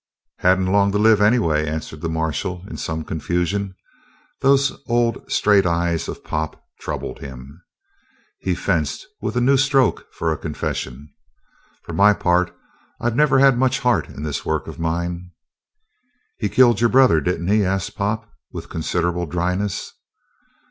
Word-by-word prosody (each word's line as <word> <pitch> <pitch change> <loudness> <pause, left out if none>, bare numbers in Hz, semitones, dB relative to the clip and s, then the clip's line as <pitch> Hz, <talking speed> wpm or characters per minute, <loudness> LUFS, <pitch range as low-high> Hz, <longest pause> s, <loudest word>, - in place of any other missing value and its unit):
"He - - +1
hadn't 95 0 +4
long 100 +1 +3
to - - +2
live, 110 0 +4
anyway," 95 -9 +3
answered 75 0 -5
the 85 - -2
marshal 80 +3 -3
in - - -8
some 80 0 -3
confusion. 90 +5 -2 0.6
Those 140 0 +2
old, 120 0 0
straight 100 -3 +4
eyes 85 -1 0
of - - -7
Pop 75 0 -3 0.2
troubled - - -5
him. 70 +4 -10 0.8
He - - -1
fenced - - -1 0.2
with - - -3
a - - +2
new 135 +3 +4
stroke 135 -3 +2
for 80 - -2
a 80 - -3
confession. 70 +3 -5 0.7
"For - - -8
my 105 +1 +5
part, 90 -1 +1 0.5
I've 120 -1 -1
never 150 -1 +4
had 135 -2 +5
much 130 -1 +1
heart 125 -2 +1
in 70 - -8
this 75 -2 -3
work - - -1
of - - -9
mine." 85 +2 -3 1.1
"He 105 - -1
killed 120 -3 +4
your 115 - +4
brother, 130 -12 +5
didn't 85 +3 -2
he?" 105 0 +3
asked 95 -1 -2
Pop 110 +3 -2 0.2
with - - -8
considerable 85 +1 -1
dryness. 90 +4 -2
90 Hz, 155 wpm, -21 LUFS, 80-115 Hz, 1.1 s, my